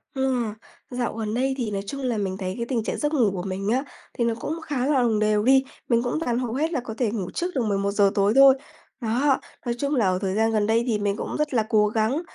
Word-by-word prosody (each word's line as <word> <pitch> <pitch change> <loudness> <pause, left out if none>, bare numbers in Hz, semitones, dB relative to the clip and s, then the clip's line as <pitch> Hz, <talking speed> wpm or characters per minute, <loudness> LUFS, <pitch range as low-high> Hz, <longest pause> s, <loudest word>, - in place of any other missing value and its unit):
Ừ. 265 -2 +1 0.5
Dạo 245 -1 -2
gần 215 -1 -3
đây 265 +2 +1
thì 230 -4 -2
nói 195 -1 -2
chung 275 -1 -5
là 245 -4 -1
mình 190 -2 -2
thấy 185 -1 -3
cái 235 - -2
tình 235 -3 -1
trạng - - -3
giấc 295 +1 -1
ngủ 235 -9 +3
của 180 -2 -4
mình 195 +1 -3
á, 260 +4 +1 0.3
thì 235 - +1
nó 230 - +1
cũng 320 +2 -4
khá 270 -5 -2
là 280 -3 +3
đồng 225 -3 +2
đều 210 0 +2
đi. 265 +2 +5 0.3
Mình 235 0 +3
cũng 245 +6 -1
toàn 245 -6 -1
hầu 240 -2 -3
hết 315 +5 0
là 275 - +1
có 235 -2 -6
thể 235 -5 0
ngủ 200 -5 -4
trước 355 +1 -3
được 260 - +1
11:00 200 0 +2
tối 200 +2 +3
thôi. 275 -1 +8 0.5
Đó, 255 +5 +2 0.3
nói 235 - -1
chung 280 +2 -1
là 230 -5 +2
ở 185 0 +1
thời 190 0 -1
gian 225 +1 +2
gần 210 -1 +1
đây 230 +1 +2
thì 215 -3 +1
mình 205 -1 0
cũng - - -5
rất 300 -2 -1
là 225 -3 +3
cố 210 -1 +4
gắng, 225 +8 0
235 Hz, 270 wpm, -24 LUFS, 210-265 Hz, 0.5 s, thôi